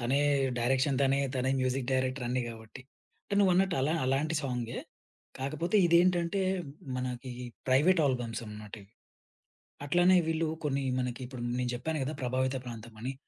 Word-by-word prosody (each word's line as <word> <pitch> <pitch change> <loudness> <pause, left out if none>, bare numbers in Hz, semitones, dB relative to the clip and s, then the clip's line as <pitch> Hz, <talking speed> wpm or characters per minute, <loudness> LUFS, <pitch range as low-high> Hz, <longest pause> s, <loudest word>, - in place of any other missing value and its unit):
తనే 130 +4 +1 0.4
డైరెక్షన్. 130 +3 +2
తనే, 135 +1 +3 0.2
తనే 130 +1 +1
మ్యూజిక్ 130 0 0
డైరెక్టర్ 130 0 0
అన్ని 125 0 0
గాబట్టి. 115 +3 -10 0.4
అంటే 200 - -3
నువ్వన్నట్టు 185 -1 +3
అలా 150 +5 +1
అలాంటి 140 +5 +1
సాంగే. 125 -3 -3 0.6
కాకపోతే 155 +9 -1
ఇదేంటంటే, 175 +2 +3 0.5
మనకి 125 0 -4 0.4
ప్రైవేట్ 160 +7 +4
ఆల్బమ్స్ 120 -3 -2
అన్నమాట 105 0 -8
ఇవి. 100 +3 -21 0.9
అట్లనే 175 +4 +5
వీళ్ళు 160 0 0 0.2
కొన్ని 140 -2 0 0.2
మనకిప్పుడు 125 0 -4 0.2
నేను 125 - -1
జెప్పాను 155 +5 -2
గదా! 145 +3 -3
ప్రభావిత 130 +1 0
ప్రాంతం 115 -1 -8
అని. 130 +3 -3
130 Hz, 135 wpm, -30 LUFS, 125-155 Hz, 0.9 s, అట్లనే